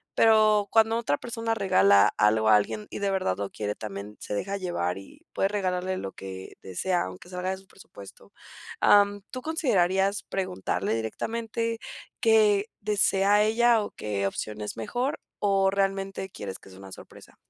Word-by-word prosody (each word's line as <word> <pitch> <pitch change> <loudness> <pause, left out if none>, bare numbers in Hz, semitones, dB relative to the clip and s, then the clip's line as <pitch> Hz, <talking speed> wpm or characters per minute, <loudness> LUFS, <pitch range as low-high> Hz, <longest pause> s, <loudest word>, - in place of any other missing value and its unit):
pero 215 -2 +5
cuando 225 0 +4
otra 220 -11 0
persona 230 -1 -3
regala 100 - +4
algo 110 +1 +3
a 110 - +8
alguien 105 0 0
y - - -5
de 200 -1 0
verdad 190 - 0
lo 100 -1 -3
quiere, 105 -1 -3
también 105 0 -7
se - - -5
deja 195 - -2
llevar 95 - -2
y 95 - -16
puede 195 - +1
regalarle 185 -2 -2
lo 95 - -5
que 95 -1 -9
desea, 175 - -1
aunque 95 - -10
salga 180 0 -3
de 190 - -3
su 190 - -17
presupuesto. 100 - -14 0.5
Am, 205 0 +4
¿tú 255 -2 -5
considerarías 200 - +1
preguntarle 185 -9 -2
directamente 230 - -3 0.4
qué 215 -2 +4
desea 205 0 +3
ella 230 +1 +3
o 205 - -4
qué 100 -2 -2
opción 105 +2 -5
es 105 - -5
mejor, 245 - -2 0.2
o 195 -1 +2
realmente 195 0 -1
quieres 100 - -7
que - - -16
sea 95 - -14
una 95 0 -11
sorpresa? - - -14
190 Hz, 165 wpm, -27 LUFS, -, 0.5 s, a